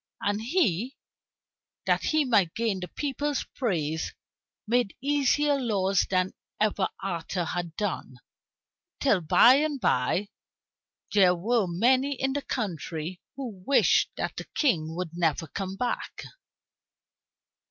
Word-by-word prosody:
And 205 +1 -1
he, 245 - 0 0.9
that - - +1
he 310 -2 +2
might 205 -9 +2
gain 225 -4 0
the 180 - -5
people's 290 - -2
praise, 160 - -2 0.5
made 235 -2 +1
easier 285 +1 +2
laws 195 -6 +1
than 185 0 +1 0.3
ever 210 -2 +1
Arthur 175 -1 -2
had 170 -1 -4
done, 195 -10 -3 0.8
till 215 -10 +3
by 240 - +6
and 295 -1 0
by 180 - +1 0.8
there 185 -3 +5
were 215 +3 +1
many 255 +10 +2
in 270 0 0
the 285 - -1
country 175 - -4
who 235 -9 -7
wished 280 +7 +4
that - - -3
the - - -5
King 160 - +1
would 180 -2 -4
never 165 -2 0
come 190 +4 -5
back. 245 +4 -3
205 Hz, 120 wpm, -27 LUFS, 175-260 Hz, 0.9 s, by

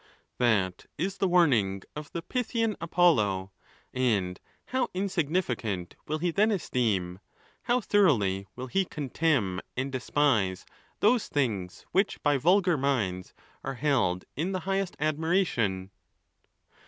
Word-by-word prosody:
That 100 -7 +1
is 190 +5 -2
the 195 - +2
warning 120 - +3
of 150 -1 -7
the 170 - -4
Pythian 230 -2 -1
Apollo, 110 - +2 0.4
And 105 -8 0 0.3
how 255 -2 -1
insignificant 155 - -1
will 155 - -1
he 175 +2 0
then 210 +6 +3
esteem, 105 - -1 0.5
how 245 +1 +2
thoroughly 105 - +2
will 125 - -5
he 190 +10 +1
contemn 140 - 0 0.2
and 135 +2 -1
despise, 120 -7 +1 0.4
those 225 +2 +3
things 105 -10 -2
which 195 +2 +1
by 145 -1 +3
vulgar 180 +3 +3
minds 110 -10 -1 0.3
are 135 0 -4
held 120 -10 +1
in 175 +6 -2
the 185 - -2
highest 195 0 -1
admiration 150 - 0
140 Hz, 120 wpm, -28 LUFS, -, 0.5 s, warning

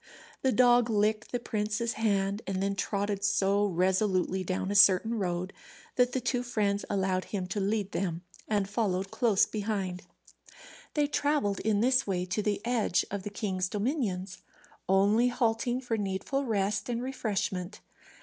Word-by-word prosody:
The 265 - +2
dog 245 -1 +4
licked 215 0 +1
the 245 - -1
prince's 215 +1 -2
hand, 200 -2 0
and 195 - -2
then 200 +1 0
trotted 200 0 -2
so 200 0 +2
resolutely 185 0 +1
down 185 +1 -2
a - - -2
certain 200 +3 +6
road 180 0 -2 0.4
that 250 0 +3
the 260 - +1
two 245 0 -1
friends 210 -5 -1
allowed 190 -2 0
him 195 -3 -3
to 205 - -2
lead 200 0 -1
them 175 -2 -2 0.2
and 205 -2 0
followed 195 -2 -1
close 225 -6 +3
behind. 200 -4 -3 0.9
They 295 -1 +3
travelled 285 -8 0
in 210 -1 +1
this 255 +1 +3
way 180 -2 -1
to 185 +4 -1
the 205 +1 -2
edge 235 -7 +1
of 200 0 -3
the 205 - -5
king's 190 -3 -2
dominions, 200 - -2 0.5
only 205 +5 +4
halting 245 0 0
for 235 -3 -2
needful 205 +8 -2
rest 205 -2 -1
and 240 0 -2
refreshment. 205 -7 -3
205 Hz, 155 wpm, -29 LUFS, 195-230 Hz, 0.9 s, certain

